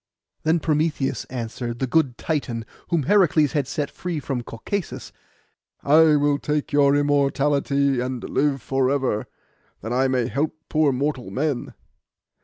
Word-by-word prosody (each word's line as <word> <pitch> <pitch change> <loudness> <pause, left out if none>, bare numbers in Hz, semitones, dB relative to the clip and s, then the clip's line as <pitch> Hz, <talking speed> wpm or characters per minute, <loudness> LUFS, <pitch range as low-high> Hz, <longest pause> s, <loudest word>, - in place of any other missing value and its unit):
Then 160 +2 +2
Prometheus 155 -2 0
answered, 120 -1 -5
the 130 - -1
good 130 -3 +1
Titan, 125 -8 -2 0.2
whom 170 -4 +1
Heracles 170 -5 +3
had 145 -4 -1
set 145 0 -3
free 175 -3 -4
from 135 -3 -3
Caucasus, 145 - -5 0.7
'I 155 +1 +6
will 145 0 +2
take 150 +1 -2
your 140 -1 +4
immortality 140 -1 +2
and 125 0 -3
live 140 -3 0
for 135 -1 +1
ever, 130 -6 0 0.5
that 110 +4 -4
I 130 +2 +2
may 130 -2 +1
help 140 +6 -1
poor 155 -2 +3
mortal 130 -3 -2
men. 135 +4 -2
140 Hz, 140 wpm, -23 LUFS, 130-150 Hz, 0.7 s, I